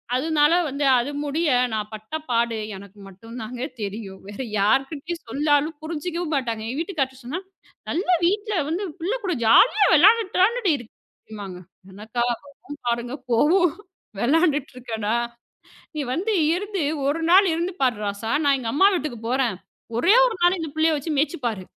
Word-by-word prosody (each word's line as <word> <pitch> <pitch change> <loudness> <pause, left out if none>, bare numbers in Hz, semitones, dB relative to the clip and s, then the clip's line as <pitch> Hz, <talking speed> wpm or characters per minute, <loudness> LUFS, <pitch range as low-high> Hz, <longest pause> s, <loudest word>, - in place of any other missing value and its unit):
அதனால 300 +3 +3 0.2
வந்து, 280 +1 -2
அது 250 +4 -2
முடிய 300 +3 0 0.2
நான் 210 -1 -3
பட்ட 215 +7 -10 0.2
பாடு 235 -1 +1 0.2
எனக்கு 200 +1 -13
மட்டும் 225 +5 -12
தாங்க 240 +3 -7 0.2
தெரியும். 200 -1 -6
வேற 205 +4 -7 0.2
யார்கிட்டயும் 280 - 0
சொல்லாலும் 290 +5 +1
புரிஞ்சிக்கவும் 335 +1 -3
மாட்டாங்க. 230 -5 -2
எங்க 255 +6 -3
வீட்டுக்காரர் 320 -6 -1
கிட்ட 265 0 -17
சொன்னா, 295 +9 -3 0.5
"நல்ல 355 +4 -2 0.2
வீட்ல 415 +3 0
வந்து 345 +6 -2 0.2
புள்ள 355 +7 -1
கூட 370 -2 0
ஜாலியா 410 - +6
விளையாண்டுட்டு 410 +6 +5
தானடி 450 -2 +2
இருக்க." 240 -3 -13 1.0
என்னக்கா 215 +5 -5
வரும் 285 +3 -8
பாருங்க 240 +1 -1 0.2
கோவம். 330 +9 +4 0.5
"விளையாண்டுட்டு 295 - +2
இருக்கேனா? 225 -3 -3 0.8
நீ - - -1
வந்து 400 +9 -1 0.2
இருந்து 395 0 -3 0.2
ஒரு 290 +4 0
நாள் 380 +2 +7
இருந்து 340 +3 -2
பாரு 250 -5 +2
ராசா. 205 +2 -3
நான் 280 -1 +4
எங்க 235 -3 -3
அம்மா 380 +7 +6
வீட்டுக்குப் 250 -9 -4
போறேன். 250 -6 +1 0.4
ஒரே 350 - +5
ஒரு 480 - -1
நாள் 350 +2 +4
இந்தப் 315 -3 -6
புள்ளைய 315 0 +2
வச்சு 290 +3 -5
மேய்ச்சு 315 +5 0
பாரு. 215 -5 -2
285 Hz, 155 wpm, -23 LUFS, 235-340 Hz, 1.0 s, நாள்